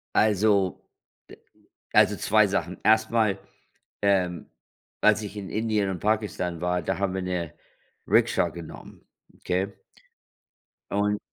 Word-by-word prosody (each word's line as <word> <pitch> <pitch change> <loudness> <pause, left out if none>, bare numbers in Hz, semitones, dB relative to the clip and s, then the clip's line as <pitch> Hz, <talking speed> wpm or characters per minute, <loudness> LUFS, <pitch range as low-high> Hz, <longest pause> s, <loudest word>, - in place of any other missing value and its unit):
Also, 100 -3 +2 0.5
d - - -12 0.6
also - - +5
2 - - +3
Sachen. - - -2
Erstmal, 110 -2 +3 0.6
ähm, 95 -4 +1 0.5
als 110 0 +4
ich 105 0 -7
in 100 -2 -6
Indien 110 -2 0
und 95 - -4
Pakistan 100 -5 -1
war, 90 0 0
da 80 - -2
haben 100 -2 0
wir 95 - -2
'ne 90 -4 -3 0.5
Rikscha - - +3
genommen, 85 -2 -11 0.3
okay? 95 +2 -2 1.2
Und 105 +1 +1
100 Hz, 115 wpm, -26 LUFS, 90-105 Hz, 1.2 s, also